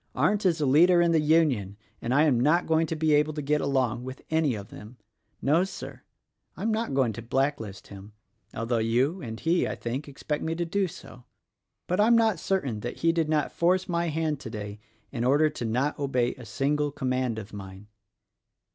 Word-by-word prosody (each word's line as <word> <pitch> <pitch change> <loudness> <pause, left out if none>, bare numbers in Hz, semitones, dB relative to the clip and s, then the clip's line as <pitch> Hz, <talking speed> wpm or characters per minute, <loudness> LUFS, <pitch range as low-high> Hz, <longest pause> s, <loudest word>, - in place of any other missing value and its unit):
Arndt 190 +9 +2
is 170 -3 +1
a 150 - +1
leader 170 +6 +5
in 170 -1 +3
the 165 - +4
Union, 145 - +2 0.2
and 115 - -3
I 145 +4 +4
am 140 -7 +3
not 155 +7 +3
going 160 0 +2
to 160 - -3
be 155 -1 +2
able 150 +1 +3
to 150 - -4
get 150 +2 +1
along 130 -4 0
with 130 +1 -8
any 160 -6 +2
of 100 +1 -8
them. 110 +3 -12 0.5
No, 155 +6 +3
Sir, 190 0 -8 0.6
I - - -6
am 225 - +1
not 220 -9 -1
going 130 -5 +2
to 115 - -7
blacklist 115 -5 -2
him, 100 +1 -11 0.4
although 115 +1 -1
you 125 +11 +1
and 110 -4 -6
he, 170 +2 +1
I - - -3
think, 130 +5 -4
expect 150 +1 -4
me 165 0 -2
to 170 +1 -2
do 195 +3 0
so. 125 -8 -12 0.6
But 180 +3 -1
I'm 225 +3 +5
not 220 -6 +2
certain 140 - -1
that 120 +3 -5
he 165 - +4
did 165 -2 0
not 155 -1 +1
force 185 +2 +1
my 170 -1 0
hand 155 -2 -1
today 105 -4 -7 0.3
in 120 -4 -3
order 145 +4 +3
to 125 - -5
not 130 +7 -1
obey 125 -4 0
a 125 - -12
single 145 +6 0
com 135 -2 -3
mand 130 -3 0
of 105 -1 -8
mine. 95 0 -9
145 Hz, 210 wpm, -27 LUFS, 120-165 Hz, 0.6 s, leader